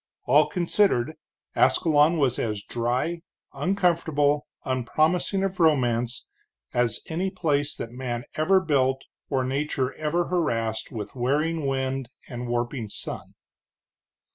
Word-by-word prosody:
All 145 +4 +5
considered, 170 -6 +2 0.4
Ascalon 160 0 +4
was 135 -5 +1
as 105 -3 -2
dry, 125 +8 -1 0.3
uncomfortable, 165 -6 +1 0.2
unpromising 155 - +1
of 195 -1 -2
romance, 125 -7 +2 0.5
as 120 -2 +1
any 180 +4 -1
place 145 -5 0
that 115 - -6
man 120 -1 -4
ever 190 +5 +4
built 135 -5 +1 0.3
or 135 -2 +1
nature 135 0 -1
ever 160 +3 0
harassed 115 -12 -1
with 105 -3 -6
wearing 145 +5 0
wind 135 -1 -1 0.2
and 120 -1 -5
warping 120 -1 -2
sun. - - -6
140 Hz, 115 wpm, -26 LUFS, 120-165 Hz, 0.5 s, All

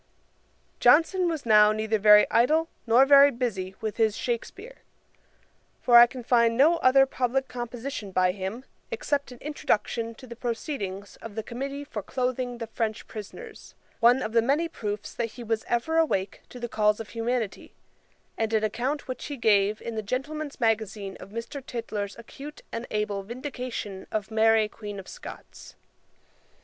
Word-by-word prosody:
] - - -40
Johnson 335 +7 +5
was 315 -5 -4
now 210 -1 +6
neither 215 0 0
very 210 0 +7
idle, 310 +8 +3 0.2
nor 240 +4 +6
very 280 0 +8
busy 205 -8 -3
with 215 -1 -3
his 220 -2 +2
Shakspeare; 390 - -4 1.0
for 240 -1 +7
I 240 - +9
can 250 0 -9
find 235 -1 +3
no 315 +6 +5
other 270 -2 +5
public 265 0 -1
composition 240 -2 -6
by 185 -1 +2
him 195 +7 -6 0.2
except 300 - -2
an 250 - -10
introduction 230 -5 -1
to 255 - -13
the 235 -2 -9
proceedings 225 - -5
of 225 -3 -10
the 220 - -3
Committee 275 +5 -5
for 225 -7 -6
cloathing 250 +2 -2
the 235 - -5
French 225 -1 -3
Prisoners;[*] 420 - -10 0.2
one 245 +3 +5
of 215 - -3
the 230 0 +4
many 285 +8 +1
proofs 210 -9 -5
that 230 -2 -3
he 245 - -9
was 225 -1 -1
ever 320 +8 +1
awake 195 -12 0
to 250 - -10
the 240 - -3
calls 210 -2 +2
of 225 - -7
humanity; 230 -2 -3 0.6
and 225 -1 0
an 215 - +1
account 255 +7 -2
which 255 - -5
he 285 - -5
gave 210 -2 +2
in 230 - -4
the 220 - -2
Gentlemen's 285 +7 -4
Magazine 215 -4 -1
of - - -11
Mr. 230 +6 -6
Tytler's 215 -5 -5
acute 275 +6 -10
and 230 +1 -5
able 210 -2 -2
vindication 240 -3 -6
of 215 0 -3
Mary 220 0 +4
Queen 205 -2 -8
of 190 - -11
Scots. - - -11
235 Hz, 165 wpm, -26 LUFS, 215-265 Hz, 1.0 s, I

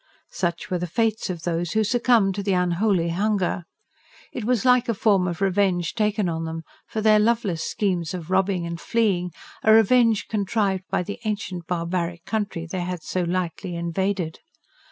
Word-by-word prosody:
Such 175 -1 -3
were 180 - 0
the 180 - -3
fates 220 +4 0
of 170 -3 -5
those 170 -1 -1
who 220 - +3
succumbed 225 -2 +3
to 200 - -3
the 195 -1 0
"unholy 180 0 +1
hunger." 190 -1 0 0.7
It 230 - -4
was 245 -1 +1
like 250 -1 +4
a 230 - +1
form 195 -3 +3
of 175 +1 -4
revenge 190 -3 +1
taken 210 -2 +1
on 165 -1 -2
them, 165 0 -5 0.2
for 220 - -3
their 215 0 +5
loveless 210 -6 +1
schemes 180 -5 -1
of 175 0 -7
robbing 190 -2 +1
and 170 0 -5
fleeing; 200 -6 +1 0.3
a 220 - +4
revenge 225 0 +5
contrived 200 -2 0
by - - 0
the 205 +3 -6
ancient, 200 -5 -3
barbaric 170 0 -2
country 205 -6 -2
they 180 +2 -4
had 175 -2 -4
so 185 - -2
lightly 175 +1 -2
invaded. 170 0 -2
190 Hz, 175 wpm, -24 LUFS, 175-215 Hz, 0.7 s, their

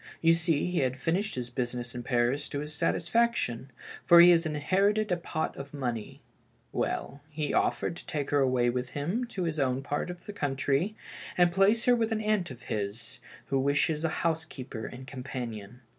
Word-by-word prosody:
You 165 0 +5
see, 165 -3 +1
he 180 -1 0
had 130 0 0
finished 185 +9 -1
his 125 -1 -5
business 120 -1 -3
in 120 - -5
Paris 125 +4 0
to 145 - -3
his 150 +1 -6
satisfaction, 160 - 0 0.3
for 170 - +8
he 175 +1 +10
has 165 -1 +4
inherited 195 +8 +1
a - - +4
pot 165 -2 -3
of 140 +1 -8
money. 120 -6 -4 0.5
Well, 140 +2 -2
he 150 -1 -3
offered - - +1
to - - -11
take 145 -2 -3
her 145 - +3
away 130 -3 +3
with 125 0 -3
him 180 - -1
to 200 -6 -4
his 160 -2 -2
own 130 -1 +1
part 145 +5 -2
of 180 0 -8
the 205 - -7
coun 145 -8 -2
try, 140 +10 0 0.4
and 175 -1 +5
place 195 +5 +3
her 245 - +6
with 225 -1 0
an 220 - +1
aunt 210 -5 +1
of 125 -3 -10
his, 105 +2 -4 0.3
who 135 - +2
wants 145 +3 +1
a 165 - +2
housekeeper 155 -9 -3
and 130 +1 -9
companion." 125 -4 -6
145 Hz, 190 wpm, -29 LUFS, 125-175 Hz, 0.5 s, he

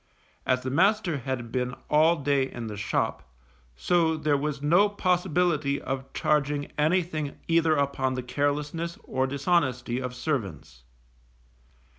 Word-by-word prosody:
As 130 0 +1
the 130 - -3
master 185 0 +2
had 120 -2 -4
been 125 0 -2
all 155 +3 +4
day 140 -3 0
in 120 -1 -6
the 105 -2 -5
shop, 100 0 -1 0.5
so 165 - +2
there 150 -1 +1
was 145 0 -2
no 175 +8 +4
possibility 175 -7 +1
of 135 0 -5
charging 145 -1 0
anything 155 -1 0
either 165 -1 +3
upon 135 -2 0
the 125 - -3
carelessness 145 +5 -2
or 130 0 -1
dishonesty 130 -4 0
of 125 -1 -5
servants. 100 - -4
145 Hz, 130 wpm, -27 LUFS, 130-165 Hz, 0.5 s, all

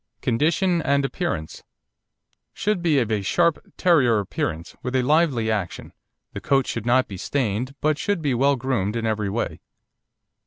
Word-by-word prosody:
CONDITION 165 - +1
AND 140 -1 +1
APPEARANCE 135 - -3 0.9
Should 210 -3 -1
be 165 -4 +2
of 115 -4 +1
a 105 -2 +1
sharp 170 - +2 0.2
Terrier 135 -11 +4
appearance, 85 -4 -3
with 125 +1 -3
a 130 - +2
lively 140 -6 +2
action, 100 -6 -4 0.4
the - - -6
coat 135 -1 +2
should 115 0 -4
not 130 +2 +3
be 95 - -7
stained, 125 +3 -2
but 155 +1 +1
should 205 0 0
be 145 -4 0
well 140 +3 +3
groomed 120 -5 -1
in 115 -1 -2
every 110 -2 -1
way. 110 +4 -3
130 Hz, 160 wpm, -23 LUFS, 110-155 Hz, 0.9 s, Terrier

